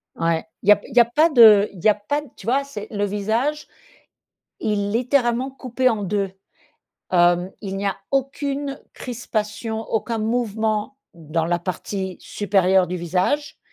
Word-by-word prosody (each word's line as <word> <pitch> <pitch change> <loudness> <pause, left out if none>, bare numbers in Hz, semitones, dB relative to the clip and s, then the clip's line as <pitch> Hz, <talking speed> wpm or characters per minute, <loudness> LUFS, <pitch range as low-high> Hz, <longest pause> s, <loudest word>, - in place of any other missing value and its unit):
Ouais 165 -1 0 0.2
il 200 - +1
y - - +10
a - - +9
p 205 - -15
il 250 - -11
y 245 - +7
a - - +5
pas 300 +8 +3
de 220 -7 +7
il 175 - -12
y - - +6
a - - +6
pas 215 +9 -2 0.2
tu - - -12
vois, 265 +5 +2
c'est 220 -7 -8
le 205 -2 -1
visage 225 +9 -1 0.9
il 205 -1 -1
littéralement 245 +1 +1
coupé 255 -1 -1
en 220 -4 +1
2. 195 0 -1 0.8
Hem, 175 +1 +3
il 195 -2 -5
n'y 200 - -3
a 195 - -1
aucune 275 +1 -2
crispation 220 -2 -4
aucun 225 +1 -2
mouvement 220 +1 -1 0.2
dans 160 0 -3
la 175 +1 0
partie 190 +1 -4
supérieure 190 -2 +2
du 180 - -3
visage 180 - -1
215 Hz, 165 wpm, -22 LUFS, 195-250 Hz, 0.9 s, y